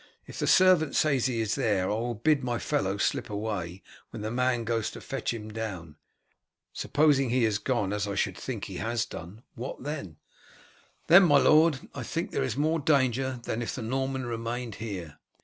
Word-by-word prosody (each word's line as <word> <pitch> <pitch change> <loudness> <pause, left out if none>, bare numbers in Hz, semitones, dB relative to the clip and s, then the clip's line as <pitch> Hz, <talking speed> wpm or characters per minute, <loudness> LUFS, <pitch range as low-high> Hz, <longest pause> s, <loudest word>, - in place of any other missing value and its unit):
If - - -9
the - - 0
servant 185 -5 +5
says 140 -5 +2
he 120 -3 -1
is 110 -1 -1
there 100 -4 +1
I - - +1
will 120 +2 -2
bid 140 +5 +2
my 120 -1 -1
fellow 100 -11 -1
slip 105 - -1
away 100 -4 -4 0.3
when - - -7
the 110 - -3
man 125 -1 +1
goes 115 -1 -1
to - - -9
fetch 135 -3 -3
him 110 -2 -6
down. 95 -9 -5 0.8
Supposing 145 -3 +2
he 125 0 +2
has 105 -2 +1
gone, 105 -3 -1
as 105 0 -1
I 100 - -3
should - - 0
think - - -5
he - - -7
has 115 +1 -1
done, 105 +1 -10
what 125 +1 -7
then?" 140 - -5 0.9
"Then, 175 +3 +8
my 145 -4 +6
lord, 155 -1 +4
I - - -6
think - - -3
there - - -1
is 65 - -2
more 160 +3 +1
danger 130 -3 +1
than 115 - -3
if 120 - -3
the 125 - -5
Norman 130 +2 -2
remained 115 0 -4
here. 95 -9 -6
120 Hz, 195 wpm, -28 LUFS, 105-135 Hz, 0.9 s, Then